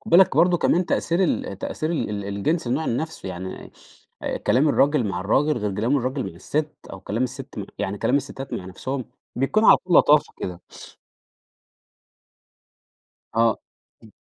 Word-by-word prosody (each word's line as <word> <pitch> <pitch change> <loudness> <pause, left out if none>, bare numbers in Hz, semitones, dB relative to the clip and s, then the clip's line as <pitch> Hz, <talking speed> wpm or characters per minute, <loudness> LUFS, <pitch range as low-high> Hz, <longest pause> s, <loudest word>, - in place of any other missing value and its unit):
خد 220 - -10
بالك 180 +2 +6
برضو 175 0 +4
كمان 175 +2 +2
تأثير 170 +3 +1
ال 100 - -2
تأثير 155 +9 -3
ال 165 -9 -1
ال 100 -1 -4
الجنس 130 - -1
النوع 135 +7 0
ال 115 - 0
نَفْسه 160 +3 -5
يعني، 95 +1 -7 0.7
كلام 135 +5 +4
الراجل 145 -2 +3
مع 90 -2 -3
الراجل 135 +10 +2
غير 105 -3 -2
كلام 115 +8 +1
الراجل 130 +1 -1
مع - - -15
الست، 150 0 -2 0.2
أو 95 - -8
كلام 110 +6 -2
الست 130 0 -5
مع 100 - -3
يعني 100 +1 -3
كلام 130 - +2
الستات 135 -1 -5
مع - - -4
نَفْسهم 130 +8 -5 0.3
بيكون 135 - +2
على - - +8
طول 180 -1 +1
لطافة 150 +1 +5
كده. 90 -1 -6 2.7
آه، 115 -1 +3 0.5
إمم. - - -16
135 Hz, 165 wpm, -23 LUFS, 105-155 Hz, 2.7 s, على